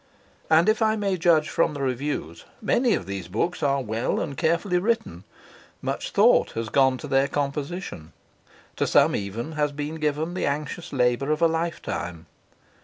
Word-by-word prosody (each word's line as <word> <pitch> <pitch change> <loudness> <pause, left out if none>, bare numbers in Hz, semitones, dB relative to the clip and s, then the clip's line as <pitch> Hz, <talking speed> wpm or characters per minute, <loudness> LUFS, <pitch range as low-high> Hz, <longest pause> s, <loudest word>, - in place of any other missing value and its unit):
And 160 +3 +5
if 215 +1 +2
I 220 0 +3
may 200 -3 0
judge 165 -3 +3
from 150 +1 +1
the 140 - -5
reviews, 130 - -3
many 235 +1 +2
of - - -4
these 95 -3 -5
books 140 - -2
are 140 -1 +1
well 110 +1 -1
and 140 - -3
carefully 175 +5 +1
written; 190 - -2 0.5
much - - -3
thought - - +4
has 115 -1 -3
gone 130 0 +3
to 150 - -8
their 135 0 +3
composition; 145 - -4 0.7
to - - +1
some - - +4
even 105 +9 -4
has 150 -2 0
been 150 +2 -5
given 155 +3 -1
the 185 - -1
anxious 150 +4 -3
labour 125 +1 +1
of 155 +2 +1
a - - +7
lifetime. 160 - -3
145 Hz, 170 wpm, -25 LUFS, 125-170 Hz, 0.7 s, a